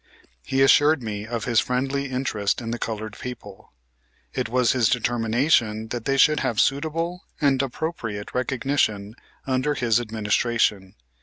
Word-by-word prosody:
He 135 - +1
assured 145 +1 +5
me 105 -1 -5
of 115 -2 -3
his 120 -2 +3
friendly 135 +4 -1
interest 125 -6 -1
in 115 -2 -5
the 120 - -3
colored 110 -1 -4
people. 105 -6 -9 0.6
It - - -2
was 125 -1 +2
his 125 -4 +2
determination 115 -1 +1
that 120 -1 -5
they 135 0 +1
should 150 +2 +5
have 110 -3 -1
suitable 165 - 0
and 140 -3 +3
appropriate 120 -7 -4
recognition 125 -5 -1 0.3
under 135 +3 0
his 120 -3 +2
administration. 110 -3 0
120 Hz, 140 wpm, -24 LUFS, 110-135 Hz, 0.6 s, assured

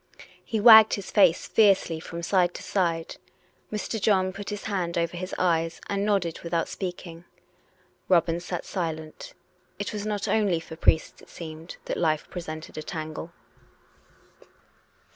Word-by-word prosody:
" - - -24
He 220 - -2
wagged 220 0 +9
his 200 -2 -7
face 185 -5 +4
fiercely 195 -6 +3
from 170 +1 -7
side 180 0 +2
to - - -7
side. 170 -4 -1 0.5
Mr. 215 +1 -3
John 190 -2 +2
put 200 +1 -7
his 205 -1 -5
hand 180 -5 -2
over 170 +1 -1
his 185 +2 -5
eyes 165 -2 +1
and 200 0 -1
nodded 195 -6 0
without 170 -1 -1
speaking. 175 -2 -7 0.8
Robin 170 -2 +3
sat 175 0 -5
silent: 160 -4 -5 0.4
it 205 +2 -4
was 210 -1 -4
not 210 -1 -2
only 205 -6 +2
for 160 0 -10
priests, 160 0 +1
it - - -18
seemed, 160 0 -9
that - - -3
life 155 -2 0
presented 155 -3 -7
a - - -4
tangle. 155 +1 -6
175 Hz, 150 wpm, -26 LUFS, 165-200 Hz, 0.8 s, wagged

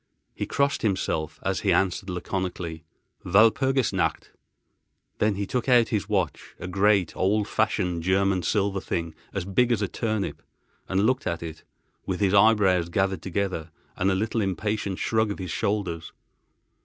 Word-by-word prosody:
He - - -4
crossed 140 -1 +1
himself, 80 -7 -1
as 95 0 0
he 100 - +1
answered 95 +1 +1
laconically: 90 -2 -4 0.4
"Walpurgis 115 +7 +3
nacht." - - -1 0.9
Then 105 -1 +2
he 100 +1 -2
took 125 +5 -2
out 120 -2 +5
his 105 -2 -1
watch, 95 -8 -2
a - - -5
great, 95 -1 +2
old 100 +2 +1
fashioned 90 -2 0
German 95 +1 +2
silver 100 0 0
thing 85 -1 -3 0.2
as 95 -3 -3
big 120 +6 +2
as 115 -3 +1
a - - 0
turnip, 110 -2 -2 0.5
and 95 +2 +2
looked 130 +3 +1
at 85 -1 -2
it, 80 -1 -8 0.4
with 95 -2 -2
his 100 -2 +2
eyebrows 100 -4 +4
gathered 95 -1 0
together 95 -3 -2 0.3
and 95 +1 +1
a 95 - +2
little 110 +3 0
impatient 100 0 -2
shrug 110 -1 +1
of 100 - -3
his 90 -4 -5
shoulders. 100 -6 -2
95 Hz, 155 wpm, -26 LUFS, 90-105 Hz, 0.9 s, out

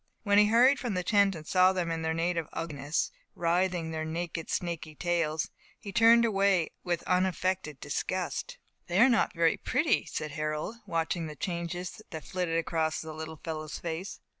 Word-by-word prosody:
When 205 -1 +5
he 210 - +6
hurried 250 +5 +5
from 235 -6 -2
the 180 - 0
tent, 200 0 +3
and 155 -1 -8
saw 185 +3 +4
them 175 -3 -1
in 165 0 -2
their 160 0 0
native 165 -1 0
ugliness, 150 -1 -2 0.2
writhing 175 -1 +1
their 160 0 -3
naked, 165 0 -4
snakey 165 -3 -3
tails, 165 -2 0 0.3
he 200 - -7
turned 235 +2 +6
away 195 -5 +2
with 175 -2 -1
unaffected 185 -4 0
disgust. - - -3 0.3
"They 175 +2 +1
are 250 +4 +7
not 235 -4 +2
very 165 -1 +3
pretty," 300 +6 +1
said 155 -1 -4
Harold, 155 +7 -3
watching 165 0 -1
the 150 - -7
changes 175 +4 -4
that 160 -5 -7
flitted 180 -3 -1
across 160 -1 0
the 160 0 -6
little 160 0 -7
fellow's 155 -2 -4
face. 170 +3 -5
170 Hz, 170 wpm, -29 LUFS, 160-190 Hz, 0.3 s, are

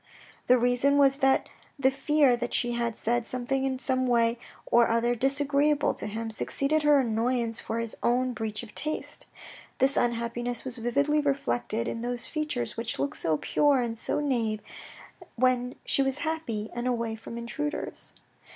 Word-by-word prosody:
The 250 - +6
reason 245 +4 +3
was 275 -1 +5
that 270 -1 +3 0.3
the 270 -1 +3
fear 275 -1 +3
that 240 0 -3
she 240 - 0
had 235 -1 -2
said 235 0 0
something 265 +2 -1
in 260 -1 -1
some 260 -1 0
way 235 -1 +2 0.3
or 235 0 +4
other 230 +1 +2
disagreeable 285 +3 +2
to - - -5
him, 225 +2 -4
succeeded 275 +7 0
her 295 -1 +5
annoyance 235 -1 0
for 225 - -4
his 230 -1 -3
own 250 +1 +1
breach 220 -1 -4
of 215 -3 -12
taste. 310 +1 -5 0.5
This 270 +1 +2
unhappiness 240 0 -1
was 255 -1 -5
vividly 280 +6 +1
reflected 120 - -1
in 230 - -3
those 245 0 -2
features 305 - -2
which 230 0 -3
looked 140 +1 -2
so 160 -2 +1
pure 285 - +2
and 230 -1 -3
so 225 - -1
nave 230 -7 0 0.7
when 250 0 +1
she - - +1
was 270 0 0
happy 240 -10 -3
and 240 +1 -3
away 230 -2 -1
from 230 +1 -9
intruders. 295 +6 -4
245 Hz, 165 wpm, -28 LUFS, 230-275 Hz, 0.7 s, The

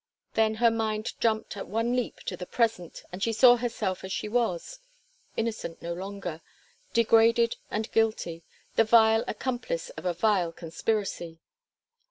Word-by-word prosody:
Then 220 0 +2
her 230 +1 +4
mind 220 -1 -2
jumped 220 -2 0
at 200 - -6
one 230 +5 0
leap 250 -2 -2
to 180 - -4
the 180 0 -7
present, 225 -8 -1
and 180 +2 -7
she 230 - +1
saw 245 +2 +7
herself 225 -6 -2
as 190 - -6
she 210 - -2
was 230 - -1 0.6
innocent 225 -7 -3
no 170 0 -4
longer, 185 -3 -6 0.5
degraded 230 0 +4
and 215 +1 -3
guilty, 215 -7 0 0.4
the 225 - +7
vile 225 0 +5
accomplice 485 - -3
of - - -10
a 180 - +1
vile 185 -4 +2
conspiracy. 170 0 -3
220 Hz, 150 wpm, -28 LUFS, 185-230 Hz, 0.6 s, saw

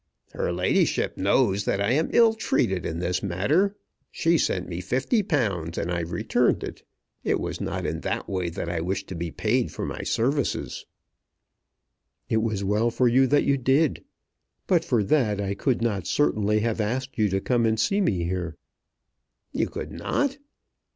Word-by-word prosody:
"Her - - -2
ladyship - - +1
knows 100 0 +2
that 100 - 0
I 100 +3 +1
am 155 +5 +2
ill 230 -2 +5
treated 95 - 0
in 80 - -4
this 90 +1 -1
matter. 145 - +1 0.3
She 165 +1 +1
sent 90 - 0
me 85 0 -4
£50 120 - 0
and 90 - -2
I 85 - 0
returned 85 +1 0
it. - - -7 0.4
It - - +1
was - - -4
not - - -3
in - - -2
that - - -3
way 90 -3 -2
that 85 0 -5
I 85 -1 -2
wished 95 +3 -2
to 95 - -5
be 85 0 -3
paid 115 +8 0
for - - -4
my - - -5
services." 135 +3 -1 1.4
"It 110 - +2
was 110 -3 -1
well 105 +4 +2
for 120 +2 +2
you 130 +3 +4
that 145 +2 +3
you 140 0 +2
did. 135 +4 +2 0.6
But 175 -3 +3
for 120 -8 +1
that 105 -4 +2
I 100 -1 -1
could 120 +3 0
not 100 -7 -1
certainly 105 -7 +2
have 115 0 0
asked 130 +4 -3
you 105 -1 +3
to 95 0 0
come 115 +2 +1
and 110 0 +1
see 200 - +2
me 95 - +1
here." 90 -2 -3 1.0
"You - - 0
could - - -6
not?" 280 -1 -1
110 Hz, 175 wpm, -25 LUFS, 95-135 Hz, 1.4 s, ill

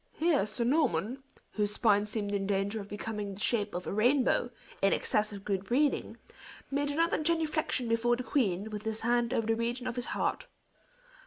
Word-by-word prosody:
Here 310 - +2
Sir 225 +3 -1
Norman, 250 - +1 0.3
whose 210 -1 -1
spine 210 -2 +3
seemed 205 -1 -3
in 195 -1 -1
danger 200 +2 0
of 200 - -9
becoming 210 -1 -5
the - - -10
shape 210 -3 0
of 180 - -4
a - - -3
rainbow, 245 +3 +3 0.3
in 195 - +4
excess 210 0 +1
of 200 -1 -9
good 195 -2 -1
breeding, 275 +7 +1 0.5
made 285 +1 0
another 325 +2 +1
genuflection 310 -5 0
before 230 +1 +2
the 250 - -5
queen, 220 -7 0
with 210 -1 -4
his 220 0 -3
hand 240 0 +1
over 225 - 0
the 225 +1 +2
region 240 +2 -2
of 250 -1 -3
his 245 - -2
heart. - - -1
225 Hz, 185 wpm, -30 LUFS, 205-255 Hz, 0.5 s, in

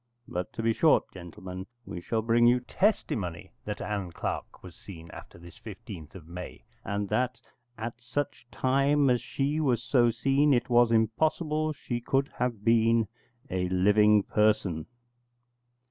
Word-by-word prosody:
But 90 0 -4
to 115 - -4
be 115 0 +3
short, 160 +6 +3
gentlemen, 95 +1 -8 0.2
we 85 - -6
shall 110 +4 -1
bring 120 +1 +4
you 125 +1 +4
testimony 100 - -1
that 105 0 -4
Ann 100 -4 -3
Clark - - -5
was 90 -2 -11
seen 85 -4 -11
after - - -11
this 85 0 -14
15th 100 -7 -10
of 85 -4 -11
May, 90 +1 -8 0.2
and 100 0 -2
that, 125 0 0 0.4
at 115 +2 -6
such 125 0 -4
time 140 +2 +2
as 120 -2 +2
she 140 +5 -1
was 125 -6 +1
so 120 0 +3
seen, 135 +5 +3
it 120 - -1
was 120 -1 +5
impossible 155 +7 +1
she 120 -4 -4
could 135 +3 0
have 120 -4 -2
been 115 -1 +4 0.4
a 90 -1 -1
living 105 +3 +4
person. 105 -8 +1
115 Hz, 150 wpm, -28 LUFS, 95-125 Hz, 0.4 s, was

